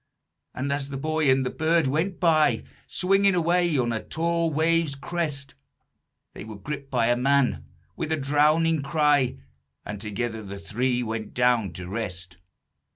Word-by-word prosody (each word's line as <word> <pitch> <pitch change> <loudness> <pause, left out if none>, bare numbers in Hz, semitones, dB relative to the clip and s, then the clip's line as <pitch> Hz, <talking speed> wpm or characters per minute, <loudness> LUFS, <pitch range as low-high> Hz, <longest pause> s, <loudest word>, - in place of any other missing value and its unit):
And, 140 +2 -1
as 140 -1 -3
the 135 - -5
boy 155 +1 0
and 130 0 +3
the 125 - -2
bird 165 0 +2
went 160 +8 -1
by, 160 -4 +3 0.2
Swinging 195 +1 +2
away 175 -2 +2
on 120 -2 +1
a 110 - -2
tall 170 0 -1
wave's 160 -1 +1
crest, 145 -2 -4 0.8
They - - -8
were 110 -1 -9
gripped 140 +6 -6
by 120 -3 +1
a 120 - +4
man, 135 +1 +1 0.3
with 155 - -4
a 160 - +1
drowning 150 +3 +2
cry, 145 -3 +2 0.5
And 105 -1 -6
together 110 +2 -3
the 100 -1 -8
three 120 +5 -1
went 110 -1 -5
down 120 -7 +2
to 90 -1 -7
rest. 90 -4 -5
140 Hz, 160 wpm, -25 LUFS, 120-160 Hz, 0.8 s, a